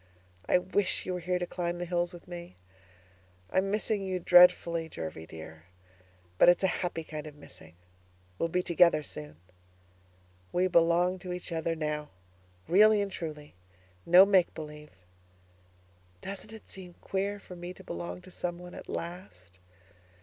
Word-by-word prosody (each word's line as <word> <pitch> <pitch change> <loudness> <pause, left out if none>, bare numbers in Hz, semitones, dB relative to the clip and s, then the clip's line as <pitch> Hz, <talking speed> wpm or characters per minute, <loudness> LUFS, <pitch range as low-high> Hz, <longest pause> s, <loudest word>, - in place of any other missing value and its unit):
I - - +6
wish 185 +2 0
you 185 - -2
were 180 - -3
here 180 +1 -1
to 180 - -2
climb 175 -1 -3
the 175 - -4
hills 175 0 -1
with 175 0 -13
me. 175 - -9 0.9
I - - +3
am 195 +1 -1
missing 210 0 0
you 190 -1 -2
dreadfully, 170 -2 +5
Jervie 80 - -7
dear, 80 0 -11 0.7
but - - +8
it's 175 +2 +4
a 190 - +1
happy 175 -2 -3
kind 155 -1 -7
of 150 - -10
missing; 145 - -14 0.6
we'll 165 - 0
be 180 +2 0
together 170 -3 +4
soon. 75 - -8 1.2
We 180 +1 +2
belong 175 +1 +3
to 180 0 -7
each 180 0 -7
other 165 0 -1
now 150 -1 -3 0.6
really 210 +4 +6
and 200 -1 -1
truly, 150 -5 -7 0.5
no 180 +3 +8
make 190 -3 +4
believe. 150 -1 -9 1.3
Doesn't 200 +2 -7
it 220 -1 -12
seem 180 -2 -11
queer 200 +1 -2
for 185 - -11
me 175 0 -7
to 185 - -13
belong 85 +1 -6
to - - -14
someone 180 0 -5
at - - -10
last? 90 - -7
175 Hz, 155 wpm, -30 LUFS, 155-185 Hz, 1.3 s, but